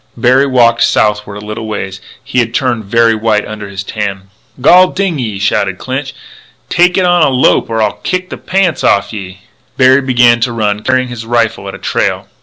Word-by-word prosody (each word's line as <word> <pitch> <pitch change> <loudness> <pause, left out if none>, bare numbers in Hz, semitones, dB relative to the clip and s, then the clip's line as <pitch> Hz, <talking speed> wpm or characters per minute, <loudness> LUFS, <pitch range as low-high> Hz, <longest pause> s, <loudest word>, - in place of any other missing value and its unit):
Berry 130 +4 +3
walked 120 -3 +3
southward 105 -1 +1
a - - -10
little 110 +1 -6
way. 105 -3 -4 0.3
He 125 - -1
had 115 -1 -1
turned 120 -5 -1
very 115 +2 +3
white 110 -1 0
under 105 -2 -7
his 95 0 -6
tan. 100 -2 -5 0.3
"Gol 180 +8 +6
ding 185 -5 -2
ye!" 110 -5 -3
shouted 95 -1 -1
Clinch, 135 +4 -5 0.5
"take 180 +1 +2
it 185 - +2
on 175 -1 +3
a 150 - +4
lope 130 -2 +2
or 115 -1 0
I'll 105 - -2
kick 185 0 -3
the - - -5
pants 185 -5 -1
off'n 100 +3 +1
ye!" 95 0 -10 0.4
Berry 130 +1 +5
began 120 -3 +3
to 120 +1 0
run, 105 -2 -1
carrying 130 +1 0
his 120 -2 -7
rifle 115 -3 -1
at 100 - -6
a - - -8
trail. - - -2
115 Hz, 200 wpm, -12 LUFS, 105-130 Hz, 0.5 s, Gol